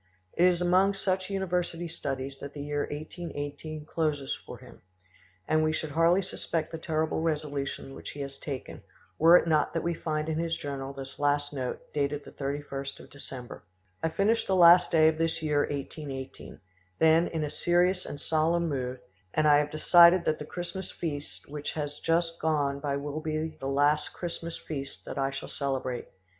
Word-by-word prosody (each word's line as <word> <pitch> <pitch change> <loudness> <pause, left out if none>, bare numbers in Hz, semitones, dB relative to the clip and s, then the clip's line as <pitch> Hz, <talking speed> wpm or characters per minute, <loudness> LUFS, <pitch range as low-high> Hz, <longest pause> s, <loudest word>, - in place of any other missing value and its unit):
It 175 - +4
is 180 -1 +2
among 185 +3 +4
such 190 -1 -1
university 180 -3 -1
studies 135 -4 -4
that 140 0 -7
the 145 - -5
year 145 0 -2
1818 150 -1 -6
closes 150 -4 -1
far - - -10
him, - - -15 0.7
and 155 0 +3
we 155 - +2
should 155 -1 -3
hardly 165 +5 +4
suspect 165 -3 -3
the 165 - -5
terrible 160 0 -1
resolution 145 -4 -2
which - - -8
he 145 - -7
has 140 0 -6
taken, 135 -4 -6 0.4
were 165 +3 +9
it - - +1
not 155 -2 +2
that 165 - 0
we 170 - 0
find 155 -1 -2
in 160 0 -1
his 165 0 -1
journal 135 -1 -4
this 135 -1 -9
last 145 0 +1
note, 130 -3 -5
dated 145 0 -1
the - - -10
31st 140 -1 -4
of - - -14
December: 130 -3 -9 0.4
"I 160 - +1
finish 210 +7 +1
the 190 - +2
last 175 0 +8
day 155 -1 +5
of 160 0 +2
this 165 -1 0
year 150 -2 +2
1818, 140 -2 -5 0.4
then, 160 +2 +5
in 160 -2 -2
a 150 - -3
serious 180 +2 +2
and 145 - -7
solemn 165 +3 +1
mood, 130 -3 -3 0.4
and 155 0 +4
I 145 -1 +7
have 150 0 0
decided 170 +3 +6
that 155 - +1
the 150 - -5
Christmas 175 +1 -5
feast 150 -4 -5
which 145 0 -5
has 145 -1 -4
just 165 0 +1
gone 145 -3 +1
by 140 -1 -1
will 145 +2 -4
be 155 0 -2
the 135 - -4
last 145 +2 +2
Christmas 170 -1 -5
feast 140 -3 -7
that - - -5
I 135 0 +1
shall 140 - -6
celebrate. 130 -3 -3
155 Hz, 185 wpm, -29 LUFS, 145-170 Hz, 0.7 s, were